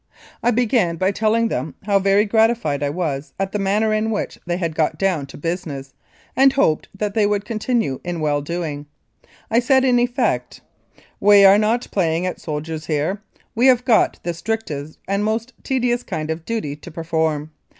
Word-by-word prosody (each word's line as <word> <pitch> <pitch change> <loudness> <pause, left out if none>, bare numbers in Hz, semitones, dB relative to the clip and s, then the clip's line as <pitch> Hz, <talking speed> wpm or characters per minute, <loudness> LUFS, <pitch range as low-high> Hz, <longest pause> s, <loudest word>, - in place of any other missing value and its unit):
I - - +2
began 230 -7 +2
by 185 +3 +1
telling 225 +2 +1
them 130 - -3
how 200 0 +2
very 200 +2 +3
gratified 220 - +2
I 145 - 0
was 150 -3 -3
at 195 0 -1
the 210 - -2
manner 210 +3 +1
in 215 +1 0
which 215 - -3
they 175 0 0
had 170 -3 -2
got 155 -1 0
down 180 -8 0
to - - -11
business, 150 -5 -4 0.4
and 270 +1 +6
hoped 265 - +1
that 205 0 -2
they 210 -1 +3
would 205 0 -1
continue 220 - -1
in 175 -1 -4
well 145 -2 0
doing. 150 -2 -4 0.6
I 230 - +4
said 265 +2 +3
in 250 -2 +4
effect: 245 +2 -1 0.3
" - - -43 0.3
We 205 -1 +7
are 195 +1 +7
not 225 +3 +1
playing 170 -2 0
at 185 - -4
soldiers 155 0 -5
here; 160 +6 -1 0.3
we 245 +2 +3
have 250 -1 +4
got 235 -4 +3
the 175 - -2
strictest 165 -6 -4
and 200 +1 0
most 225 +3 -2
tedious 245 -2 0
kind 160 -6 -4
of 160 +1 -5
duty 220 -11 -3
to 150 - -11
perform. 160 -2 -2
195 Hz, 185 wpm, -21 LUFS, 160-225 Hz, 0.6 s, We